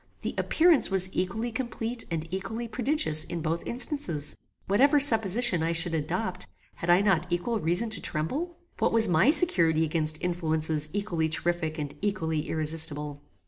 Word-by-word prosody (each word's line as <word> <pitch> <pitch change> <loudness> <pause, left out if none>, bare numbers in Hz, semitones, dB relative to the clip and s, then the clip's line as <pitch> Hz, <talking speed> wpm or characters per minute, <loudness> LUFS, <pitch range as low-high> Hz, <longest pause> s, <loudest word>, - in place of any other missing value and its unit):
The - - -4
appearance 330 -3 +3
was 190 -1 +4
equally 205 +7 -3
complete 235 0 -5
and 165 -2 -4
equally 225 +5 -5
prodigious 225 - +1
in 170 - -6
both 165 +1 -3
instances. 235 - -1 0.3
Whatever 275 +9 +2
supposition 225 - +5
I 165 +1 -1
should 165 +1 -1
adopt, 180 +4 -4 0.3
had 170 - -6
I 175 +2 +4
not 185 -4 0
equal 175 +7 -2
reason 175 +7 -1
to 215 - -1
tremble? 295 - -3 0.2
What - - 0
was 225 -1 +4
my 175 - +2
security 170 - +4
against 155 -1 +1
influences 160 -3 0
equally 175 -6 -3
terrific 160 0 -3
and 145 -2 -6
equally 165 -7 -3
irresistable? 150 -2 0
175 Hz, 150 wpm, -26 LUFS, 160-225 Hz, 0.3 s, supposition